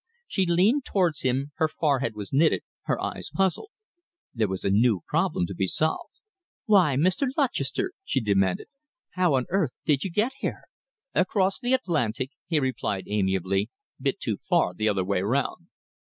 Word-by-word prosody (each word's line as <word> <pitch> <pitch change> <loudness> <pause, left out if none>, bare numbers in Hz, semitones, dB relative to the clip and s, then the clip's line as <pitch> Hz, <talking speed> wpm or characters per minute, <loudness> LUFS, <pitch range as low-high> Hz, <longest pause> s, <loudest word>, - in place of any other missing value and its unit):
She 190 -3 0
leaned 200 +11 +3
towards 175 - 0
him. 130 +3 0
Her 160 -1 +3
forehead 140 -6 0
was 105 +1 -7
knitted, 155 +4 +3 0.2
her - - 0
eyes - - -4
puzzled. 195 - 0 0.6
There 110 -3 +1
was 95 -1 -4
a 100 - +1
new 105 -2 +3
problem - - +1
to 95 - -6
be 95 +1 -1
solved. 155 - -1 0.5
"Why, 190 - +4
Mr. 185 - +2
Lutchester," 315 +7 0
she 135 - 0
demanded, 95 -5 +1 0.5
"how 180 -6 +2
on 130 -1 +1
earth 175 -8 +1
did 145 -3 +2
you 195 - -2
get 210 +8 +1
here?" - - -3 0.5
"Across 190 +1 +1
the 255 0 +2
Atlantic," 135 - -1 0.2
he 160 -3 +2
replied 115 -7 -2
amiably. 95 0 0 0.3
"Bit - - 0
too - - -2
far 90 - +1
the 110 +4 0
other 95 -2 +1
way 95 -1 0
round." 125 +8 -1
140 Hz, 165 wpm, -26 LUFS, -, 0.6 s, Why